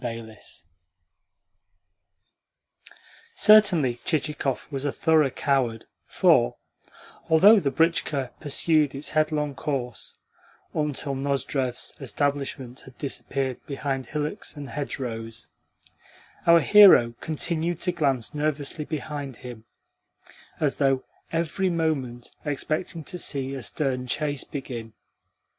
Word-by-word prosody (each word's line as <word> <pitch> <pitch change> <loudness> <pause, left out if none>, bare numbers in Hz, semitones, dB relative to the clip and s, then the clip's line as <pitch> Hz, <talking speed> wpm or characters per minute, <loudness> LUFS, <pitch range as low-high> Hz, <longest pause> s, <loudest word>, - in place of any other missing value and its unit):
CHAPTER 115 -1 -4
V 110 - -19 3.0
Certainly 180 - +5
Chichikov 150 -4 -1
was 135 -1 -4
a 145 - 0
thorough 160 -3 +3
coward, 130 -5 0 0.2
for, - - +3 0.7
although 200 +7 +7
the 145 - 0
britchka 145 -3 0
pursued 150 -1 +1
its 140 - -3
headlong 155 -2 0
course 130 -3 -4 0.6
until 145 -2 -1
Nozdrev's 135 -2 -2
establishment 135 -2 -2
had 130 - -14
disappeared 135 -2 -3
behind 135 -2 -3
hillocks 150 +7 -4
and 140 -2 -7
hedgerows, 115 -6 -5 1.0
our 170 0 +7
hero 190 - +7
continued 165 +2 -1
to 180 - +1
glance 140 -7 0
nervously 150 0 -1
behind 145 -3 -5
him, 120 -3 -10 0.9
as 145 -3 0
though 135 -2 +2 0.3
every 170 +3 0
moment 145 -8 -2
expecting 155 +3 -3
to 180 - -5
see 135 -4 0
a 135 - -5
stern 125 +2 -1
chase 145 +1 -1
begin. 120 -5 -7
140 Hz, 105 wpm, -25 LUFS, 130-155 Hz, 3.0 s, although